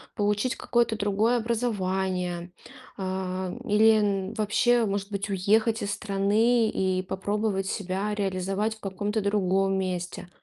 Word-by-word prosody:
получить 210 +4 0
какое-то 235 -2 +1
другое 210 +4 +2
образование. 190 -6 -1 0.5
А, 185 -1 -3
или 220 +1 +5 0.3
н - - -8
вообще, 225 +3 +2
может 200 0 -2
быть, 200 +1 -3
уехать 215 +4 +2
из 200 - -2
страны 215 +4 +2
и 185 -1 0
попробовать 195 +1 -2
себя 195 +2 -2
реализовать 195 +2 -1
в - - -20
каком-то 205 +2 -2
другом 195 -1 +1
месте. 180 -1 -4
200 Hz, 120 wpm, -26 LUFS, 190-215 Hz, 0.5 s, или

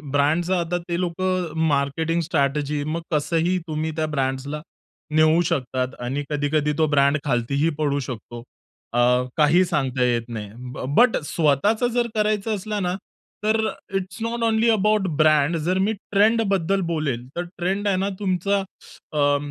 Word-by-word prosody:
ब्रँडच 155 +5 +2
आता 175 +1 -1
ते 170 - -1
लोकं 180 -1 -1
मार्केटिंग 155 +3 0
स्ट्रॅटेजी, 145 -2 0
मग 155 +3 -3
कसंही 165 +4 +1
तुम्ही 155 0 -2
त्या 160 -1 0
ब्रँड्सला 140 0 -2 0.5
नेऊ 155 +2 +5
शकतात. 130 -4 -2
आणि 130 +4 -3
कधी-कधी 150 0 0
तो 160 -1 +3
ब्रँड 140 0 +3
खालतीही 140 +4 +1
पडू 145 -2 +1
शकतो. 120 -1 -7 0.5
अ, 120 - +1 0.4
काही 160 +4 +5
सांगता 130 -6 0
येत 120 -1 +1
नाही. 105 -3 -6 0.2
ब - - -5
बट 245 -1 +5
स्वतःच 165 - +2
जर 240 -1 +1
करायचं 215 0 +1
असलं 210 0 -3
ना, 180 0 0 0.5
तर 215 +1 +2 0.4
it's 185 -1 -3
not 230 +1 -2
only 225 0 +3
about 210 -2 +2
brand 155 +1 +4
जर 185 +2 +1
मी 220 - +1
ट्रेंड 210 +3 +2
बद्दल 195 +1 +1
बोलेल. 135 -6 -2
तर 175 - -1
ट्रेंड 195 +4 -1
आहे 195 -2 +2
ना 195 +2 0
तुमचा 200 0 +1
अ, 145 -6 -2
160 Hz, 150 wpm, -23 LUFS, 145-190 Hz, 0.5 s, नेऊ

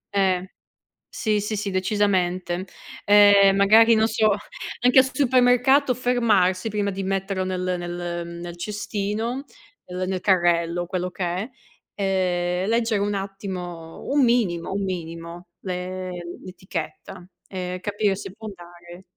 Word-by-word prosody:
Eh. 190 -2 +2 0.7
Sì, 215 -2 0
sì, 210 +1 -3
sì 200 -1 -3
decisamente. 185 -2 0 0.4
Ehm, 200 -1 +6
magari 220 +3 +6
non 220 0 +3
so 215 -1 +2 0.5
anche 250 +2 +5
al 260 0 +4
supermercato 255 +1 +4
fermarsi 225 -6 +2
prima 205 -1 -1
di 195 0 -4
metterlo 195 0 -1
nel 185 -1 -2
nel 175 0 -4
nel 175 0 -7
cestino, 210 +5 -3 0.4
uhm, 180 - -7
nel 185 -1 -2
carrello, 175 -2 +2
quello 180 0 -3
che 180 0 -3
è, 180 +7 -3 0.5
ehm, 185 -1 0
leggere 225 -3 +1
un 205 0 0
attimo, 185 -4 -6
un 280 -1 +3
minimo 205 -9 +1
un 200 +1 -2
minimo 170 -1 -6 0.2
l'e 185 0 -4 0.3
l'etichetta 185 -1 -7 0.2
e 180 -1 -5
capire 205 -1 0
se 190 - -8
può 220 +2 -10
andare 175 -2 -12
195 Hz, 130 wpm, -23 LUFS, 180-210 Hz, 0.7 s, Ehm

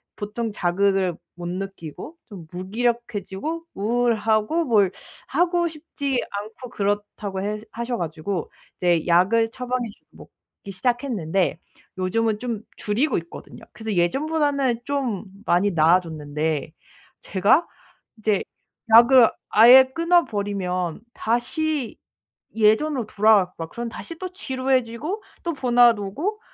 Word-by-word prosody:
보통 215 +2 -4
자극을 190 -1 +1 0.2
못 175 -1 -6
느끼고 195 - -7
좀 185 -6 -10
무기력해지고 230 - -3
우울하고 225 +6 +1
뭘 205 -7 +3 0.4
하고 345 +3 +1
싶지 290 -4 -3 0.2
않고 220 +4 -9
그렇다고 205 -2 -3
해 210 +1 -2
하셔 235 +1 -3
가지고 165 +2 -4 0.3
이제 175 -2 +1
약을 195 +7 +4
처방해 250 -1 -3
주고 205 - -16 0.3
먹기 200 - -8
시작했는데 195 - -1 0.4
요즘은 215 +4 0
좀 230 -3 -4 0.2
줄이고 240 +7 0
있거든요. 170 0 -9
그래서 220 0 -5
예전보다는 275 - +1
좀 265 -9 -2 0.2
많이 185 +4 +3
나아졌는데 155 -3 +1 0.5
제가 205 - +3 0.5
이제 210 -2 +1 0.5
약을 240 0 +8 0.2
아예 245 +5 +8
끊어 340 +1 +3
버리면 185 -4 -3
다시 260 +4 -1 0.6
예전으로 225 +3 +2
돌아가고 205 -4 +3
막 165 -1 -6
그럼 235 0 -5
다시 330 +7 -8
또 370 -1 -5
지루해지고 265 - -2 0.2
또 340 - -2
번아웃 245 -4 +4
오고 300 - -3
220 Hz, 270 characters per minute, -23 LUFS, 190-260 Hz, 0.6 s, 약을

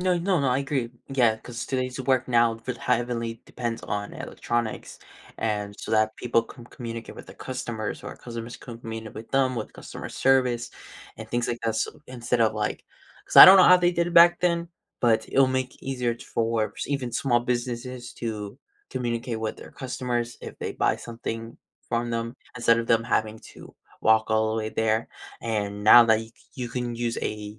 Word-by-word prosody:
no 180 -1 +2
no 180 +1 +1
no, 135 - +1
I 125 - +2
agree. 135 -4 -2 0.2
Yeah, 120 -5 +3
'cause 120 +2 -7
today's 130 -1 -2
work 130 -1 +1
now 120 -1 +4
will 125 -2 -3
heavily 120 -2 -1
depends 120 -2 -4
on 105 0 -4
electronics 120 -2 -4 0.4
and 105 -2 -2
so - - -7
that 110 0 +3
people 120 -1 +1
can 120 +1 -13
communicate 115 -2 -7
with - - -10
their - - -12
customers 120 -4 -5
or - - -6
customers 115 0 -8
communicate 115 -2 -8
with 110 +1 -9
them 135 -1 +2
with 110 - -5
customer - - -9
service 125 -3 +2 0.5
and - - -8
things 120 0 -1
like 120 - -2
that, 115 -1 0
so - - 0 0.2
instead 125 -1 -2
of, 110 - +3
like 105 -1 -3 0.4
'cause - - -5
I - - +14
don't 190 - +10
know 185 - +8
how 180 - +8
they 175 0 +2
did 170 -1 +1
it 175 - -6
back 175 +1 +7
then, 170 -1 +1 0.3
but 110 -2 +3
it'll 135 0 +4
make 130 0 -3
easier 125 -3 -1
t - - -13
Forbes 115 -1 -1
even 135 -4 -2
small 120 -1 +2
businesses 125 0 -3
to 105 -3 -5 0.3
communicate 120 -1 -3
with 110 -1 -3
their - - -12
customers 125 -2 -3
if - - -9
they - - -4
buy - - +1
something 115 -1 -6 0.3
from 120 0 -1
them 115 +1 -3 0.2
instead 115 -1 +3
of 115 - -2
them 115 0 +3
having 110 -2 0 0.2
to - - -13 0.3
walk 110 0 +4
all 110 0 +2
the 110 - -1
way 110 -1 -2
there. 110 +1 0 0.3
And 105 -3 -2
now 120 +2 +9
that 110 -1 +4
you 115 - -8
c - - -23 0.2
you 125 -2 -4
can 120 -1 -3
use 115 0 -2
a, 105 0 -5
120 Hz, 195 wpm, -25 LUFS, 110-125 Hz, 0.5 s, I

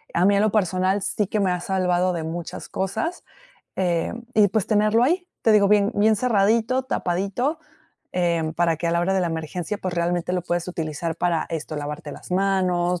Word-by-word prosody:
A 175 - +3
mí 200 +1 +5
en 200 - +3
lo 215 0 +2
personal 190 -1 +1
sí 210 0 -1
que 210 - -1
me 190 -2 +2
ha 180 - -1
salvado 180 0 +1
de 165 -2 -3
muchas 165 +1 -6
cosas, 260 - -3 0.5
em, 180 +5 -1
y 210 -2 +5
pues, 215 -1 0
tenerlo 215 +1 +3
ahí, 355 +8 +1
te 225 - +3
digo, 205 -1 +5
bien 205 +1 +3
bien 215 +2 +4
cerradito, 230 +3 +2
tapadito, 200 - -1 0.5
em, 170 -3 0
para 170 0 +1
que 170 +2 -3
a - - +2
la 170 0 +1
hora 190 +2 +1
de 190 - +2
la 175 - 0
emergencia, 165 +5 -4
pues, 185 -2 -4
realmente 175 +1 -1
lo 180 - -1
puedes 175 0 -2
utilizar 165 -1 -3
para 170 -1 0
esto, 160 -1 -5
lavarte 145 0 -5
las - - -12
manos, 180 -2 +1
185 Hz, 200 wpm, -23 LUFS, 170-210 Hz, 0.5 s, mí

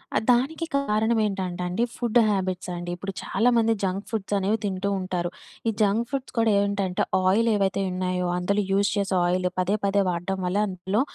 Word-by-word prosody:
ఆహ్, - - +2
దానికి 275 +7 +1
కారణమేంటంటే 210 -7 0
అండి 180 +6 0
ఫుడ్ 240 -1 +2
హ్యాబిట్స్ 185 -2 -1
అండి. 175 0 -5
ఇప్పుడు 195 +2 -6
చాలామంది 225 +1 +2
జంక్ 195 +1 -2
ఫుడ్స్ 210 -3 -3
అనేవి 200 +3 +1
తింటూ 195 0 -1
ఉంటారు. 180 -2 -2 0.4
ఈ - - +3
జంక్ 210 +3 +2
ఫుడ్స్ 275 -2 -4
కూడా 225 -1 +3
ఏంటంటే, 200 -2 0 0.2
ఆయిల్ 225 +5 +3
ఏవైతే 195 -1 +1
ఉన్నాయో, 180 0 -1
అందులో 200 +3 +1
యూజ్ 200 +1 +3
చేసే 200 -1 0
ఆయిల్ 180 +1 +1
పదే 185 +3 +1
పదే 200 0 +3
వాడడం 175 +2 -2
వల్ల 180 +2 0
అందులో 190 +3 -1
195 Hz, 165 wpm, -25 LUFS, 185-220 Hz, 0.4 s, ఈ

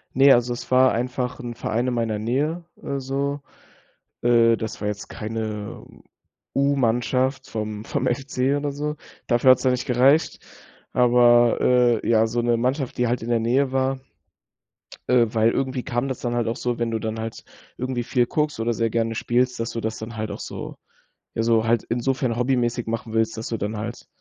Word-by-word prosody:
Ne, 135 +2 +7
also 120 0 +2
es 120 - -8
war 130 0 +5
einfach 125 +1 -2
'n 120 -1 -5
Verein 115 +2 -2
in 125 - 0
meiner 115 -3 -1
Nähe, 145 +10 -1 0.2
äh, 140 - -3
so. 140 +2 -2 0.8
Äh, 115 -1 +5
das 110 0 -6
war 105 - -1
jetzt 105 0 -6
keine 110 -1 -5 0.7
U-Mannschaft 130 0 +1
vom 110 -1 -4
vom - - -1
FC 135 +1 0
oder 145 0 -2
so. 150 +2 -3 0.3
Dafür 120 +1 +5
hat 130 - +6
es - - -8
dann 130 -1 +3
nicht 125 0 -2
gereicht, 135 +5 +3 0.5
aber, 120 -1 +5
äh, 125 -2 +3
ja, 110 -1 +4
so 120 +2 -1
'ne 120 0 +2
Mannschaft, 130 +2 -1
die 125 - +2
halt 120 +1 -1
in 115 - -5
der 120 -1 +2
Nähe 130 +4 +1
war, 130 0 0 1.1
äh, 125 -2 +5
weil 115 0 +2
irgendwie 130 -1 -2
kam 120 +3 -1
das 130 -2 -4
dann 120 -1 -2
halt 120 -1 0
auch 115 +2 -2
so, 120 -1 -2
wenn 115 -1 -1
du 115 - -1
dann 110 0 -4
halt 115 0 -6 0.3
irgendwie 125 -1 -2
viel 120 0 +1
guckst 150 -2 -1
oder 115 +1 0
sehr 115 0 0
gerne 115 0 -1
spielst, 125 +2 0
dass 115 0 -2
du 115 - -4
das 110 0 -3
dann 110 +1 -8
halt 110 0 -3
auch - - -6
so - - -7 0.6
ja, 115 - +1
so 115 -1 +2
halt 115 -1 +2
insofern 125 0 0
hobbymäßig 120 -1 0
machen 115 0 -4
willst, 115 0 +1
dass 110 - -5
du 115 - -2
dann 105 +2 -3
halt 115 +3 -6
120 Hz, 195 wpm, -23 LUFS, 115-130 Hz, 1.1 s, Ne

